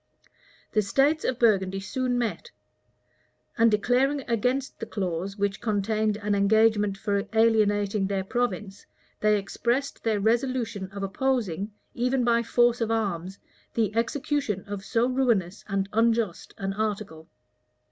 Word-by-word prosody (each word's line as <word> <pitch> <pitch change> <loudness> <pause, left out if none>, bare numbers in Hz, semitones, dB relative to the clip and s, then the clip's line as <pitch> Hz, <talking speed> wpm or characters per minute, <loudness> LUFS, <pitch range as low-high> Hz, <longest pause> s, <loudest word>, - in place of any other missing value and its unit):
The 215 - +3
states 275 +9 +2
of 255 - -1
Burgundy 195 -5 +2
soon 250 +4 -1
met; 240 - -2 1.1
and 230 0 +5
declaring 250 +7 +2
against 250 +4 -1
the 225 - -5
clause 190 0 -3
which 200 -1 -1
contained 215 0 0
an 205 0 -1
engagement 210 0 +3
for 200 0 -1
alienating 210 -3 +2
their 195 -1 -1
province, 200 -3 -3 0.3
they 210 0 +3
expressed 240 +7 -2
their 220 -2 +1
resolution 230 -3 0
of 200 0 -6
opposing, 210 -3 -1 0.2
even 250 +1 0
by 235 -1 +3
force 240 +1 +2
of 225 - 0
arms, 195 -4 -2 0.4
the 220 -2 0
execution 235 -3 -1
of 200 -1 -6
so 230 +4 +1
ruinous 235 -8 0
and 195 -1 -1
unjust 225 -4 0
an 195 0 -3
article. 200 -6 -3
215 Hz, 130 wpm, -26 LUFS, 200-240 Hz, 1.1 s, and